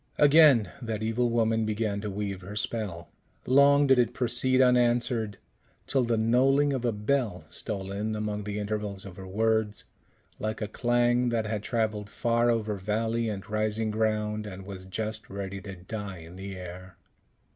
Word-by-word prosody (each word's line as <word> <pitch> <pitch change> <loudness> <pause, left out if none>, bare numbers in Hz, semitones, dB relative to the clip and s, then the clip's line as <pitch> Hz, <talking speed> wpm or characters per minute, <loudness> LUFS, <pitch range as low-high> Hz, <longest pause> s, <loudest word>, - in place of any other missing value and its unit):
Again 145 - +6
that 110 -2 -3
evil 115 +2 +1
woman 115 -1 +2
began 105 -1 -1
to 105 - -4
weave 100 -1 -4
her 100 +3 -8
spell. 100 -7 -3 0.3
Long 140 +2 +5
did 135 -2 +5
it 120 0 +1
proceed 130 +1 +2
unanswered, 120 -4 +2 0.5
till 135 -2 +1
the 115 -1 +1
knolling 135 +6 +3
of 130 -3 -2
a 120 - +2
bell 105 - -1
stole 95 -3 -4
in 105 +2 -2
among 105 -1 -3
the 105 0 -3
intervals 105 -2 -3
of 95 -2 -10
her 95 -1 -8
words, 110 +1 0 0.6
like 110 +1 -3
a 105 - -2
clang 120 +2 +2
that 115 -2 0
had 105 -1 -2
travelled 110 -2 -1
far 120 +1 +1
over 110 -3 0
valley 110 +4 -1
and 100 -1 -5
rising 110 +1 -1
ground, 105 -1 -1
and 95 -1 -8
was 95 -1 -8
just 110 +3 -4
ready 100 0 -5
to 95 -1 -8
die 100 +1 -6
in 85 +1 -12
the 95 0 -7
air. 90 0 -9
110 Hz, 165 wpm, -28 LUFS, 100-120 Hz, 0.6 s, Again